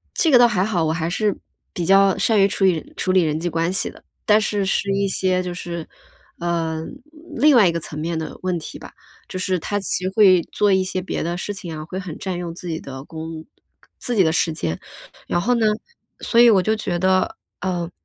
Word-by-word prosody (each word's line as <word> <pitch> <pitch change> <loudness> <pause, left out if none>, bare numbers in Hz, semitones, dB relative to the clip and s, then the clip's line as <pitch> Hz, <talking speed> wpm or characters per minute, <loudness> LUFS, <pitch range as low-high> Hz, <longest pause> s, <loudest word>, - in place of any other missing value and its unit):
这 325 - +3
个 250 - +7
倒 240 - +7
还 195 -5 +1
好， 180 -6 0
我 155 - +1
还 165 0 -2
是 205 +2 0 0.4
比 175 - -3
较 195 +1 +5
善 220 -3 +2
于 195 - +6
处 195 0 -1
理 175 -4 +1
处 185 - -2
理 185 - +4
人 155 -1 0
际 175 +2 -2
关 165 +1 0
系 190 - -1
的， - - -17 0.2
但 215 0 +5
是 205 -2 -1
是 195 +1 0
一 200 0 +1
些 185 -1 +1
就 180 -1 -4
是， 170 -2 -6 0.5
呃， 165 -2 -2 0.5
另 295 -2 +5
外 210 - +7
一 - - 0
个 170 - -2
层 150 0 -7
面 165 +2 -2
的 160 - -6
问 185 -1 -1
题 155 - -8
吧， - - -12 0.4
就 185 - -5
是 185 -1 0
它 205 +5 -2
其 185 -1 -2
实 185 - 0
会 190 -5 +6
做 205 -1 +2
一 190 0 +3
些 185 0 -3
别 - - -3
的 170 +2 -2
事 205 +3 -4
情 175 -5 -7
啊， 155 - -6
会 185 +3 -6
很 180 -5 -6
占 185 -2 -4
用 170 -1 -5
自 175 0 -8
己 160 -1 -3
的 135 -1 -8
工 160 0 -7 0.5
自 245 - -3
己 200 - +5
的 160 - +3
时 165 0 +1
间， 85 - -3 0.5
然 175 - 0
后 245 +7 +2
呢， 230 -2 +2 0.5
所 235 - +3
以 240 - +8
我 195 -5 +5
就 220 +2 +1
觉 185 -5 -2
得， 190 - +1 0.2
呃 175 -2 -2
185 Hz, 255 characters per minute, -21 LUFS, 165-200 Hz, 0.5 s, 以